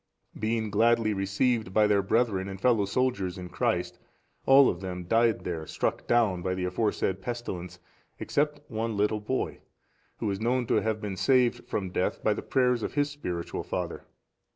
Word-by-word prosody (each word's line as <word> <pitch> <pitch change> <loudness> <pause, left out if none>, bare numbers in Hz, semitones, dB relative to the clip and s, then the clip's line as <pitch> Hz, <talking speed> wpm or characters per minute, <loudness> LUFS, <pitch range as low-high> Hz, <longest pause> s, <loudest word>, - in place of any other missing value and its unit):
Being 110 -1 -1
gladly 115 -1 +3
received 100 +1 0
by 110 - +5
their 105 -1 +3
brethren 100 -1 +1
and 95 -1 -7
fellow 115 -3 +3
soldiers 100 -5 -1
in 90 -1 -7
Christ, - - -1 0.5
all 135 0 +8
of 85 - -1
them 90 -1 -5
died 115 +4 +2
there 80 -3 -4
struck - - -2
down 110 -7 +2
by 95 +1 -1
the 90 -1 -2
aforesaid 95 0 -1
pestilence, 95 -7 -5 0.4
except 150 0 -1
one 110 -2 -3
little 105 +1 +1
boy, 130 +5 -2 0.6
who 105 - -1
is 100 +1 -4
known 125 +2 +1
to - - +2
have 110 -1 -1
been 100 -3 -4
saved 125 0 +2
from 95 -3 -3
death 90 - -1
by 110 - +3
the - - -5
prayers 125 -3 +1
of - - -4
his 145 0 +1
spiritual 90 -12 -4
father. - - -4
110 Hz, 175 wpm, -28 LUFS, 95-120 Hz, 0.6 s, all